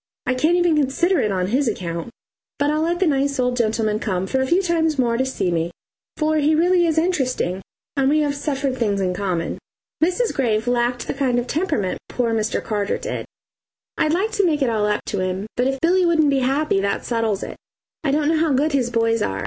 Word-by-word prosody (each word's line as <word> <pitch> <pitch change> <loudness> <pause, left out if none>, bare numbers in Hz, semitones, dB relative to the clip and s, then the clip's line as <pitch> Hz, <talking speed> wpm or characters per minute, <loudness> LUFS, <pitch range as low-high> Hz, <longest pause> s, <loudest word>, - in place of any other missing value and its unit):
I 255 - +1
can't 310 +7 +2
even 350 -2 +3
consider 300 +5 +2
it 215 -5 +1
on 185 -1 0
his 260 +4 +1
account, 170 -3 -3 0.5
but 290 0 +1
I'll 305 +1 0
let 340 +2 0
the 380 - +3
nice 280 -3 +1
old 250 0 +1
gentleman 220 -2 0
come 190 -5 -2
for 265 +6 0
a 265 - 0
few 350 +7 +3
times 325 -3 +1
more 240 -3 +2
to 260 +3 +1
see 190 -8 -1
me, 165 0 0 0.5
for 310 0 +1
he 305 +1 +3
really 350 +2 +3
is 320 -1 0
interesting, 260 - 0 0.3
and 270 -1 +2
we 305 +2 +3
have 290 -1 0
suffered 280 -2 -2
things 205 -5 0
in 185 -2 0
common. 180 -3 -2 0.4
Mrs. 370 +8 +1
Graves 225 -4 0
lacked 245 0 0
the - - -3
kind 265 -3 0
of 240 - 0
temperament 295 - -1
poor 235 -2 -1
Mr. 220 -1 -1
Carter 205 -2 -1
did. - - -5 0.7
I'd 310 - +1
like 400 +6 0
to 405 -2 +1
make 305 -4 +1
it 255 - +2
all 210 -2 +1
up 210 0 -1
to 200 - -3
him, 185 +1 -2
but 250 +1 +1
if 270 0 -1
Billy 360 +3 +3
wouldn't 315 -4 +3
be 275 - +2
happy, 270 -2 +1
that 200 0 -1
settles 225 -4 -1
it, - - -5
and - - -9 0.5
I 280 - +1
don't 295 - 0
know 320 -1 +2
how 315 -3 +2
good 290 +4 +2
his 260 -4 +1
boys 230 -1 +1
are. 95 - -1
265 Hz, 230 wpm, -21 LUFS, 220-310 Hz, 0.7 s, even